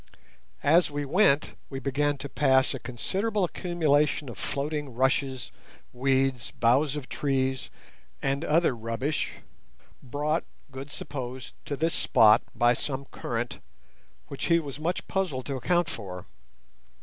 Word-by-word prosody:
As 165 +4 +5
we 145 0 -3
went 150 -2 +3 0.2
we 135 - -5
began 145 +2 0
to 140 - -6
pass 130 -1 +3
a 135 - -4
considerable 195 - -1
accumulation 155 -5 +1
of 115 - -8
floating 145 -2 -3
rushes, 130 0 0 0.4
weed, 135 0 +2 0.2
boughs 130 +5 +3
of 145 -4 -5
trees, 130 -2 -1 0.5
and 140 +2 -1
other 165 -4 +3
rubbish, 115 +6 -2 0.7
brought, 150 +5 -1 0.3
Good 135 +2 -8
supposed, 130 -3 -6
to 145 - -2
this 160 +3 +1
spot 110 -1 +5
by 120 0 +4
some 140 +2 -3
current, 120 0 -3 0.7
which 140 - -5
he 170 - +5
was 145 -3 -6
much 170 +3 -2
puzzled 170 -10 -1
to 140 - -3
account 170 +7 +1
for. 90 - -6
140 Hz, 130 wpm, -28 LUFS, 130-150 Hz, 0.7 s, As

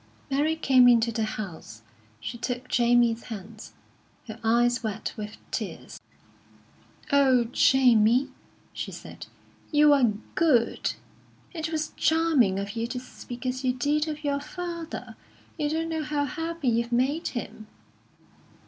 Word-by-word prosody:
Mary 300 +4 +2
came 260 -5 +5
into 235 -1 +4
the 220 -1 -1
house. 160 - -8 0.4
She 240 - -6
took 245 +1 -4
Jamie's 240 -2 +3
hands, 215 0 -9 0.5
her 220 +1 -8
eyes 240 +2 +3
wet 215 -3 -4
with 210 -1 -7
tears. - - -5 1.1
"Oh, 265 -3 +5
Jamie," 250 -1 +4 0.4
she - - -5
said, - - -10 0.4
"you 295 -1 +6
are 250 -6 +3 0.2
good! 265 -9 +2 0.6
It 320 -2 -4
was 310 -1 -2
charming 315 -12 +3
of 200 0 -3
you 230 0 -2
to 250 +1 -4
speak 250 0 -10
as 255 +1 -2
you 255 -1 +2
did 295 +5 0
of 305 0 -5
your 285 -1 0
father. 340 +2 -6 0.4
You 295 -1 0
don't 325 +2 -1
know 320 -1 -2
how 295 -1 -1
happy 325 +1 -4
you've 235 +1 0
made 275 +8 +1
him." 215 -2 -7
255 Hz, 135 wpm, -26 LUFS, 230-300 Hz, 1.1 s, you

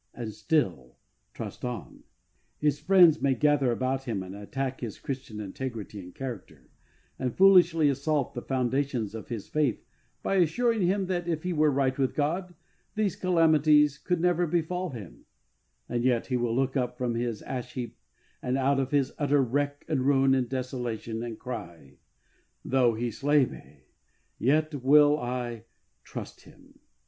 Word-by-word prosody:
and 110 -3 -5
still 90 - -1 0.3
trust - - -8
on. 120 - -6 0.6
His 145 -1 +1
friends 170 -1 +5
may 135 -1 +2
gather 140 -1 +3
about 130 +2 -1
him 110 -7 -2
and 95 0 -9
attack 130 +6 -4
his 115 -5 -5
Christian 130 -5 -6
integrity 105 0 -6
and 90 -1 -11
character, 95 - -8 0.5
and 125 -2 -3
foolishly 180 -5 +6
assault 140 0 0
the 120 - -5
foundations 130 -4 -1
of 110 - -7
his 115 -4 -5
faith 150 -7 0 0.4
by 195 - +1
assuring 225 +6 +2
him 190 +2 +1
that 175 -2 -2
if 160 -2 -2
he 180 0 -1
were 155 -1 +3
right 135 -2 +1
with 135 -1 0
God 175 +5 -1 0.4
these 210 -3 0
calamities 155 -5 +4
could 180 +1 -1
never 175 0 +2
befall 175 +3 -1
him, 110 - -10 0.6
and 120 -1 -2
yet 125 -2 +2
he 130 - -2
will 120 -2 0
look 135 +1 0
up 125 -2 -1
from 125 -2 -1
his 115 -2 -3
ash 125 -2 -5
heap 120 -3 -6 0.4
and 125 +1 -1
out 135 +1 +2
of 135 -1 -1
his 140 -2 +1
utter 145 -1 +3
wreck 145 +3 -2
and 135 -5 0
ruin 135 -1 +4
and 130 -2 +1
desolation, 120 -3 -4
and 115 -2 -5
cry, 85 - -8 0.7
"Though 125 -3 +3
He 120 +1 -2
slay 145 +4 +3
me, 70 - -13 0.6
yet 155 +5 +2
will 145 +2 +6
I 120 -2 -4 0.4
trust - - -8
Him." - - -19
135 Hz, 160 wpm, -28 LUFS, 120-150 Hz, 0.7 s, foolishly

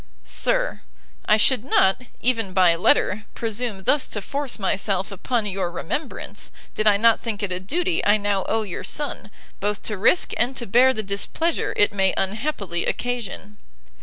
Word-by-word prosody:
SIR, - - 0 0.5
I 215 - +5
should 235 +1 +3
not, 195 -5 +3 0.2
even 225 -6 0
by 180 -3 +5
letter, 205 +4 +2
presume 225 -3 -2
thus 290 +7 +3
to 210 - -3
force 275 +5 -3
myself 195 -1 0
upon 220 +4 -2
your 190 -3 -2
remembrance, 180 - -5 0.2
did 215 - 0
I 205 -1 +6
not 230 +1 +4
think 215 -3 -4
it 195 - -2
a 180 - 0
duty 340 - -1
I 205 +1 +4
now 200 -2 0
owe 225 0 +1
your 190 -5 -6
son, 290 -8 -2 0.3
both 205 +1 -2
to 210 -3 -3
risk 345 - +3
and 250 +3 0
to 240 - -4
bear 245 +6 +5
the 220 -4 -3
displeasure 205 - -1
it 205 - +4
may 190 -2 +2
unhappily 200 - -2
occasion. 215 -4 -4
210 Hz, 165 wpm, -23 LUFS, 195-245 Hz, 0.5 s, I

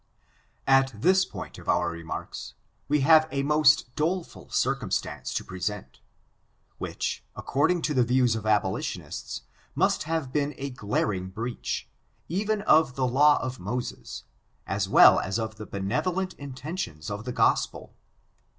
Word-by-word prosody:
At 135 -4 +3
this 185 - +4
point - - -8
of - - -8
our 85 - +2
remarks, 85 -1 -7 0.3
we 150 0 +2
have 155 +2 +6
a 140 -1 -1
most 150 -3 +4
dole 175 +4 0
ful - - -15
circumstance - - -1
to - - -1
present, 95 +3 -5 0.8
which, - - -3
according 160 +6 +1
to 150 - 0
the 125 -3 +4
views 125 -1 +2
of 110 -1 -4
abolitionists, 105 -3 -2 0.3
must - - +2
have 160 -6 -2
been 145 -1 0
a 140 0 -4
glaring 105 -5 -1
breach, 115 +5 -4 0.4
even 205 +4 -1
of 155 -9 +4
the 130 - +1
law 145 +4 +5
of 130 -1 -4
Moses, 105 - -5 0.4
as - - -1
well - - +8
as 95 +3 -2
of 110 -1 -4
the 105 - -8
benevolent 175 - -1
intentions 135 - -6
of 100 +1 -4
the 125 - -4
Gospel. - - +1
130 Hz, 140 wpm, -27 LUFS, 110-155 Hz, 0.8 s, well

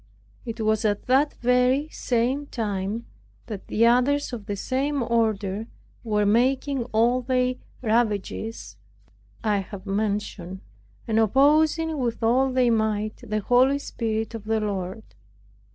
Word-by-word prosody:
It 230 0 -5
was 215 -1 +1
at 205 -2 0
the 270 +4 +3
very 250 +4 +3
same 255 +4 -1
time, 210 -1 -3 0.4
that 210 -4 -7
the 230 - +2
others 255 +4 +2
of 220 -4 -6
the 205 - -2
same 270 +6 -1
order 220 -3 0 0.4
were 210 -3 +1
making 255 +4 +1
all 240 +2 +2
the 255 0 0 0.2
ravages 220 - -1 0.7
I 210 -2 +2
have 195 0 -8
mentioned, 200 -2 -3 0.5
and 220 -1 +2
opposing 305 - +3
with 235 -2 -2
all 260 +4 +3
their 255 -2 +3
might 215 -1 0
the 215 -3 -2
Holy 255 +5 +4
Spirit 225 -5 -3
of 225 -2 -7
the 220 0 +1
Lord. 200 0 -3
230 Hz, 130 wpm, -25 LUFS, 210-255 Hz, 0.7 s, Holy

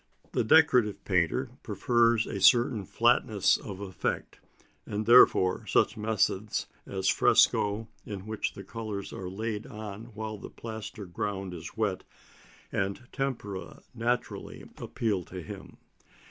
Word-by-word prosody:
The - - +1
decorative 125 -5 +4
painter 95 +8 +1
prefers 115 +2 +2
a 100 - -5
certain 120 -4 +5
flatness - - +3
of 95 -1 -7
effect, 95 -2 -3 0.5
and 105 +1 -3
therefore 110 -5 +6
such 110 - +3
methods 105 -1 0 0.2
as 95 -1 -2
fresco, 105 +2 +3 0.2
in 100 -2 -7
which 110 -1 -3
the 100 - -9
colours 105 -1 -6
are 90 -1 -5
laid 105 +2 -4
on 105 0 -7
while 110 -1 -5
the - - -8
plaster 110 -2 -7
ground 95 +1 -4
is 85 +3 -9
wet, 100 -4 0 0.7
and 100 +5 -2
tempera 115 -8 -4
naturally 120 +2 -3
appeal 105 -6 -1
to 90 - -8
him. - - -10
105 Hz, 125 wpm, -29 LUFS, 95-115 Hz, 0.7 s, therefore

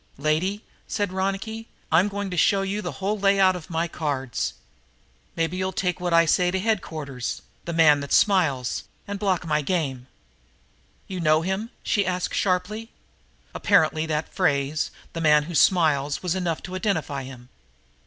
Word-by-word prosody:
"Lady," 160 +9 0 0.2
said 205 -3 -2
Ronicky, 195 +4 -3 0.2
"I'm 170 +5 +5
going 205 -1 -4
to - - -3
show 195 +3 +3
you 200 +2 -2
the - - -4
whole 205 +2 -2
layout 195 -1 +4
of 175 -3 -8
the 170 -1 -1
cards. 140 -6 -3 0.8
Maybe 165 +2 -1
you'll 185 0 -1
take 180 -2 -1
what 175 -1 -2
I 165 0 +5
say 180 +3 +3
right 180 - +2
to 190 - +1
headquarters 155 - -3 0.2
the 170 - -3
man 155 -3 +5
that 140 -1 -6
smiles 145 -11 +2 0.2
and 200 0 -4
block 190 -4 0
my 150 -1 +1
game." 135 -6 -2 1.0
"You 185 -1 -5
know 155 -1 +3
him?" 190 +5 -2
she 205 - +2
asked 180 -1 -2
sharply. 205 +4 -1 0.6
Apparently 160 -5 +2
that 155 0 -2
phrase, 150 -4 +1 0.2
"the 165 - -4
man 150 -2 +5
who 170 +3 -7
smiles," 150 -5 +3
was 180 -2 0
enough 175 -4 -2
to 180 - -6
identify 185 -8 -1
him. 130 -2 -11
175 Hz, 165 wpm, -24 LUFS, 155-195 Hz, 1.0 s, I'm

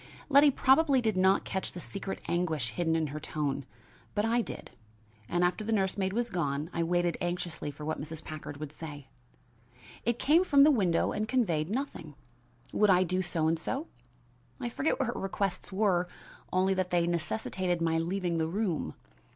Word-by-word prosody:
Letty 285 +1 +7
probably 275 +1 +4
did 220 -4 0
not 190 +1 +4
catch 190 - -3
the 175 - -6
secret 195 +2 -5
anguish 160 -9 0
hidden 165 +6 0
in 160 -1 +1
her 155 - -4
tone, 145 -3 -2 0.5
but 205 +1 +2
I 235 +2 +2
did, - - -7 0.6
and 175 0 +1
after 180 +5 +1
the 225 - -3
nurse 195 -3 +2
maid 190 -1 0
was 235 +3 -1
gone, 155 -2 -1
I 170 - 0
waited 175 +1 +1
anxiously 175 -3 -3
for 145 +1 -8
what 155 - -2
Mrs. 160 +1 -7
Packard 150 -2 -7
would 150 -1 -6
say. 145 -3 -9 0.9
It 235 +1 +1
came 320 +8 +4
from 280 -6 +6
the 305 - +7
window 190 - +2
and 215 +1 -2
conveyed 175 -11 +1
nothing. 270 +7 -4 0.6
Would 210 - +4
I 185 -1 +6
do 185 +1 0
so 165 -3 0
and 165 0 +1
so? 270 - -3 0.7
I 240 - -2
forget 285 - 0
what 265 - +2
her - - -1
requests 195 0 -2
were, 190 -3 +2 0.4
only 190 +1 +3
that 185 -1 -1
they 175 -1 +2
necessitated 175 +1 -1
my 165 -1 +1
leaving 175 0 -1
the 160 - +1
room. 175 - -2
180 Hz, 185 wpm, -30 LUFS, 165-215 Hz, 0.9 s, Letty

